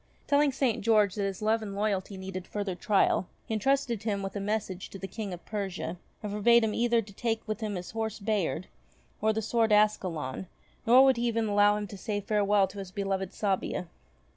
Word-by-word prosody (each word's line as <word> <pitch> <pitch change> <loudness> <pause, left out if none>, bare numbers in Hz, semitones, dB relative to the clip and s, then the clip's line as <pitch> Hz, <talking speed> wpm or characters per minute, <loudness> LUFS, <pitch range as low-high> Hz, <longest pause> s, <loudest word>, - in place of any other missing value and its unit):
Telling 285 0 +3
St. 260 -4 0
George 210 -3 +4
that 205 - -3
his 195 +1 -4
love 220 +1 +2
and 200 -2 -6
loyalty 200 -1 -1
needed 190 -1 -6
further 205 -2 -3
trial, 190 0 +2 0.2
he - - -4
entrusted 240 0 +1
him 205 -3 -2
with 195 +1 -5
a - - -1
message 200 -2 -3
to - - -8
the 195 - -6
King 210 -1 -5
of 175 -1 -8
Persia, 195 -4 -4 0.3
and 210 - -3
forbade 235 +3 +5
him 215 -1 0
either 235 -1 +2
to 200 0 -14
take 225 +1 -2
with 215 +1 -2
him 215 -3 -3
his 180 -1 -6
horse 220 -1 -3
Bayard 205 -4 -1 0.6
or 220 +1 +3
his 220 0 -2
sword 230 -2 +2
Ascalon; 185 -8 +1 0.4
nor 250 +3 +8
would 265 -2 +4
he 240 +1 0
even 230 -1 0
allow 205 0 +4
him 210 - -3
to 200 0 -9
say 210 -1 -2
farewell 205 -1 +2
to 200 - -9
his 195 -2 -6
beloved 195 -1 -2
Sabia. 190 -3 -2
210 Hz, 210 wpm, -29 LUFS, 195-220 Hz, 0.6 s, nor